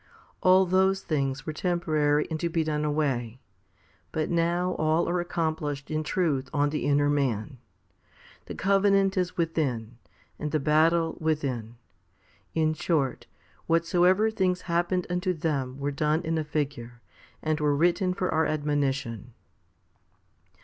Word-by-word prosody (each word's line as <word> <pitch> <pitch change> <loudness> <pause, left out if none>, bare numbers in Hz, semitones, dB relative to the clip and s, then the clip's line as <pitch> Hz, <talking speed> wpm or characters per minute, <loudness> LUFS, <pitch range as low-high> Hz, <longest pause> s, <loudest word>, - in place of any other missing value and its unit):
All 185 +1 +5
those 190 +1 +2
things 135 -4 -2
were 155 - -3
temporary 155 -4 +1
and 160 - -2
to 170 - -1
be 165 -1 0
done 150 -1 -1
away; 135 -6 -1 0.7
but 155 +1 -2
now 175 +2 +1
all 155 +2 +2
are 175 +1 0
accomplished 155 -4 -3
in 155 0 0
truth 155 -4 -1
on 145 -1 +1
the 150 - -2
inner 145 0 +3
man. 130 -4 -1 0.9
The - - -6
covenant 195 0 +3
is 180 -1 -1
within, 130 -9 -2 0.4
and 150 - -2
the 155 - +1
battle 160 +3 +2
within. 135 -8 -2 0.8
In 155 -1 +2
short, 155 -5 -1 0.4
whatsoever 180 +5 +3
things 185 -4 0
happened 175 +1 0
unto 180 +1 -1
them 140 -5 -2
were 140 +1 -2
done 150 +4 0
in 165 0 -1
a - - -1
figure, 140 -5 -4 0.4
and 155 0 0
were 150 -1 +2
written 175 +4 +2
for 185 -2 -1
our 160 0 +2
admonition. 135 -6 -2
155 Hz, 135 wpm, -27 LUFS, 145-175 Hz, 0.9 s, All